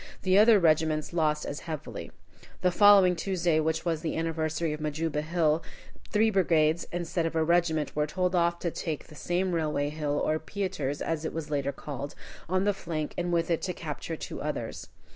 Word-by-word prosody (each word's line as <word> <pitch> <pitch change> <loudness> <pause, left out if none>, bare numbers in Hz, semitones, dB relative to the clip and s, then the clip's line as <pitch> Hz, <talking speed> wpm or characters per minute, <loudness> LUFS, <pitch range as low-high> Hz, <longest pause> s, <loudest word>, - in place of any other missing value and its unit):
The 185 0 +3
other 220 0 +7
regiments 155 -3 +2
lost 155 -3 +1
as 145 - -4
heavily. 155 -3 -6 0.5
The 180 - +3
following 195 -1 +6
Tuesday, 170 -2 +1
which 160 +2 -1
was 165 -2 0
the 160 - -2
anniversary 160 -1 -1
of 150 - -6
Majuba 155 0 -1
Hill, 160 0 +1 0.5
three 220 +1 +3
brigades, 165 -4 +2
instead 170 -1 -1
of 165 - -5
a 160 - +3
regiment, 165 -2 +1
were 150 0 +1
told 180 +3 -1
off 170 -1 +2
to 170 - -1
take 160 -3 -4
this 150 - -13
same 180 +1 0
Railway 150 -3 0
Hill, 150 -1 -2
or 155 0 +1
Pieter's, 160 -6 -3
as 165 -1 -2
it 160 - -3
was 155 -2 -5
later 140 -1 0
called, 140 0 -7 0.3
on 185 +1 +2
the 205 0 +2
flank, 160 -5 -4
and 175 0 -2
with 170 0 +1
it 165 - +1
to 180 - -2
capture 160 0 -5
two - - -7
others. - - -4
165 Hz, 190 wpm, -28 LUFS, 155-175 Hz, 0.5 s, other